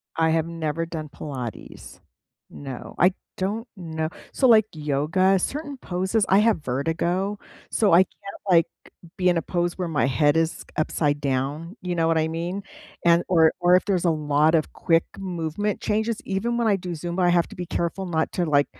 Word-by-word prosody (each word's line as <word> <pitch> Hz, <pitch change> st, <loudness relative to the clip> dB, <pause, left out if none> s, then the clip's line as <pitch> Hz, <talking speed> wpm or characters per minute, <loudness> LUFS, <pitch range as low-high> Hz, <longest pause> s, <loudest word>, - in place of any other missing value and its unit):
I 160 Hz, 0 st, +2 dB
have 160 Hz, 0 st, +1 dB
never 165 Hz, -1 st, -2 dB
done 160 Hz, -2 st, -6 dB
Pilates. 130 Hz, -7 st, -8 dB, 0.5 s
No, 135 Hz, -3 st, -8 dB
I 180 Hz, +1 st, +5 dB, 0.2 s
don't 210 Hz, +5 st, -2 dB
know 160 Hz, -4 st, -4 dB, 0.2 s
so, 265 Hz, -, +2 dB
like, 220 Hz, -3 st, +6 dB
yoga, 155 Hz, +6 st, +1 dB
certain 285 Hz, -, -4 dB
poses 190 Hz, 0 st, -1 dB
I 195 Hz, -, +6 dB
have 210 Hz, -7 st, +2 dB
vertigo, 170 Hz, +9 st, -1 dB, 0.3 s
so 210 Hz, -3 st, +2 dB
I 175 Hz, +2 st, +8 dB
can't, 200 Hz, +1 st, -12 dB
like, 170 Hz, -2 st, +5 dB, 0.5 s
be 185 Hz, -1 st, +3 dB
in 175 Hz, -, +2 dB
a -, -, +1 dB
pose 175 Hz, 0 st, -1 dB
where 180 Hz, -2 st, -2 dB
my 155 Hz, -3 st, +1 dB
head 145 Hz, +3 st, +2 dB
is 165 Hz, 0 st, 0 dB
upside 150 Hz, -1 st, 0 dB
down. 145 Hz, +6 st, -2 dB
You 180 Hz, -1 st, -3 dB
know 165 Hz, -1 st, +2 dB
what 165 Hz, 0 st, +2 dB
I 160 Hz, 0 st, +2 dB
mean? 170 Hz, +5 st, -4 dB, 0.4 s
And 170 Hz, 0 st, +5 dB
or 165 Hz, -3 st, +5 dB
or 175 Hz, 0 st, +5 dB
if 185 Hz, -, +2 dB
there's 185 Hz, -4 st, 0 dB
a 170 Hz, -, +4 dB
lot 150 Hz, 0 st, +2 dB
of 155 Hz, -, 0 dB
quick 165 Hz, 0 st, +2 dB
movement 185 Hz, +2 st, -3 dB
changes, 220 Hz, +1 st, 0 dB
even 230 Hz, +5 st, -1 dB
when 235 Hz, -1 st, +1 dB
I 205 Hz, -, +4 dB
do 180 Hz, -2 st, -5 dB
Zumba, 175 Hz, +2 st, 0 dB
have 175 Hz, -1 st, +3 dB
to 210 Hz, -, -11 dB
be 180 Hz, -2 st, -5 dB
careful 175 Hz, +2 st, -2 dB
not 160 Hz, -3 st, -1 dB
to, 175 Hz, -, 0 dB
like 145 Hz, -2 st, +3 dB
170 Hz, 190 wpm, -24 LUFS, 155-190 Hz, 0.5 s, I